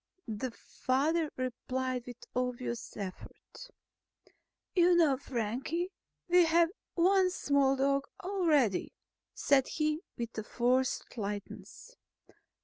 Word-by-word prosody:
The 220 +3 -3
father 295 +7 0
replied 255 0 -3
with 245 0 -10
obvious 250 -1 -3
effort. 200 - -8 1.1
"You 355 -1 +5
know, 320 -5 +5
Frankie, 270 - -2 0.4
we 355 0 +6
have 330 +1 +4 0.2
one 370 +2 +4
small 280 -6 +2
dog 275 +1 +1
already," 320 - +1 0.4
said 270 -2 +3
he 305 0 0 0.2
with 230 -2 -4
forced 250 +1 0
lightness. 205 - -6
270 Hz, 95 wpm, -32 LUFS, 245-335 Hz, 1.1 s, we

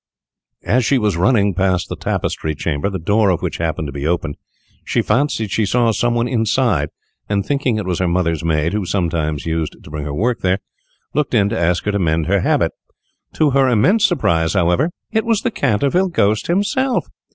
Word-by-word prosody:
As 130 +1 +2
she 135 - +2
was 105 -6 +1
running 100 +2 +2
past 95 0 0
the - - -5
Tapestry 80 -1 -2
Chamber, 75 +4 -2
the 95 - -3
door 100 +4 +2
of 90 - 0
which - - -2
happened 80 -2 -2
to - - -6
be 70 +2 -4
open, 80 -3 -1 0.5
she - - 0
fancied 115 -7 0
she 110 - +1
saw 115 +3 +2
some 120 +2 0
one 120 +1 +1
inside, 115 - +1 0.4
and 100 -1 0
thinking 140 -4 0
it 105 - -3
was 90 -2 -2
her 90 - +1
mother's 85 -3 0
maid, 80 +1 0
who 105 -1 -1
sometimes 85 -5 -1
used 80 -1 -2
to - - -12
bring 75 -1 -5
her 75 - -4
work 120 +8 0
there, 95 0 +1 0.6
looked 145 -3 0
in 100 -2 +3
to 115 - -2
ask 85 +1 +1
her 105 - +1
to 100 - -1
mend 80 -3 +1
her 100 +4 +2
habit. - - +1 0.6
To 150 -2 +2
her 135 -1 +3
immense 185 - +3
surprise, 85 - +2
however, 90 - +2 0.2
it 220 0 +1
was 225 -3 +1
the 245 - -1
Canterville 140 - +1
Ghost 110 - +1
himself! 240 +9 +1
100 Hz, 200 wpm, -18 LUFS, 85-125 Hz, 0.6 s, in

